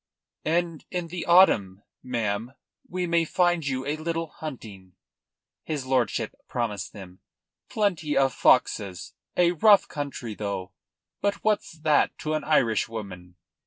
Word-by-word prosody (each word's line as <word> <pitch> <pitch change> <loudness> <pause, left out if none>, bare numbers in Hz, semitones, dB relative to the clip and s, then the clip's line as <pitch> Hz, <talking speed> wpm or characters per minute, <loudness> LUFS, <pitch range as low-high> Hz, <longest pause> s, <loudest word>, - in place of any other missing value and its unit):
"And 165 0 0
in 175 -2 -3
the 175 +1 -5
autumn, 105 - +5 0.2
ma'am, 115 -1 -2 0.4
we 180 0 -2
may 170 -1 +2
find 175 -2 +1
you 130 -1 -2
a 145 +2 -2
little 165 0 -3
hunting," 105 - -9 0.7
his 150 -4 -4
lordship 125 -3 0
promised 105 -7 -3
them. 95 -2 -11 0.5
"Plenty 175 -8 0
of 135 -1 +3
foxes; 95 -2 +2 0.2
a 175 -1 +5
rough 200 +4 +5
country, 140 -6 -5
though; 100 -3 -4 0.5
but 200 0 -1
what's 215 -5 0
that 155 -2 +2
to 155 - -3
an 155 -1 -1
Irishwoman?" 110 - -1
140 Hz, 125 wpm, -26 LUFS, 105-170 Hz, 0.7 s, autumn